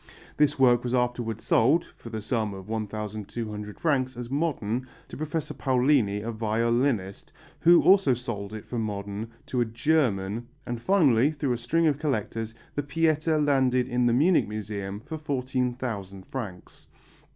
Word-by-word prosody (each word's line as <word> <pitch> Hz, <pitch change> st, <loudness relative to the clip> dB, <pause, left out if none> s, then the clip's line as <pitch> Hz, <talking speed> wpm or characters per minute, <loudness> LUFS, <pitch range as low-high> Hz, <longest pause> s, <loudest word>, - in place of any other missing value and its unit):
This 145 Hz, -1 st, +3 dB
work 125 Hz, -3 st, +5 dB
was 125 Hz, 0 st, 0 dB
afterwards 120 Hz, -3 st, -1 dB
sold 145 Hz, +10 st, +3 dB
(for 115 Hz, -, -11 dB
the 110 Hz, -2 st, -5 dB
sum 110 Hz, -4 st, -1 dB
of 95 Hz, 0 st, -10 dB
1200 105 Hz, 0 st, -5 dB
francs), 130 Hz, -6 st, 0 dB
as 120 Hz, 0 st, -6 dB
modern, 130 Hz, -5 st, -1 dB, 0.2 s
to -, -, -8 dB
Professor 155 Hz, 0 st, -3 dB
Paolini, 130 Hz, -6 st, +2 dB
a 115 Hz, -, -3 dB
violinist, 115 Hz, -1 st, 0 dB, 0.3 s
who 170 Hz, +1 st, +6 dB
also 190 Hz, -9 st, +5 dB
sold 110 Hz, -5 st, -5 dB
it 110 Hz, -1 st, -7 dB
for 120 Hz, -, -4 dB
modern 105 Hz, 0 st, -4 dB, 0.2 s
to 125 Hz, -, -1 dB
a -, -, +3 dB
German, 115 Hz, -4 st, 0 dB, 0.2 s
and 120 Hz, -1 st, -4 dB
finally, 145 Hz, -, +4 dB
through 145 Hz, -4 st, -1 dB
a -, -, -2 dB
string 165 Hz, +8 st, +1 dB
of 150 Hz, -3 st, +2 dB
collectors, 115 Hz, -6 st, -2 dB, 0.2 s
the 145 Hz, -, -1 dB
Pietà 155 Hz, +2 st, +1 dB
landed 130 Hz, -3 st, +2 dB
in 125 Hz, -1 st, +1 dB
the 120 Hz, -, +3 dB
Munich 160 Hz, +8 st, +4 dB
Museum 105 Hz, -1 st, -5 dB
for 155 Hz, +6 st, -7 dB
14,000 125 Hz, -8 st, -3 dB
francs. 100 Hz, -9 st, -8 dB
120 Hz, 150 wpm, -27 LUFS, 110-140 Hz, 0.3 s, who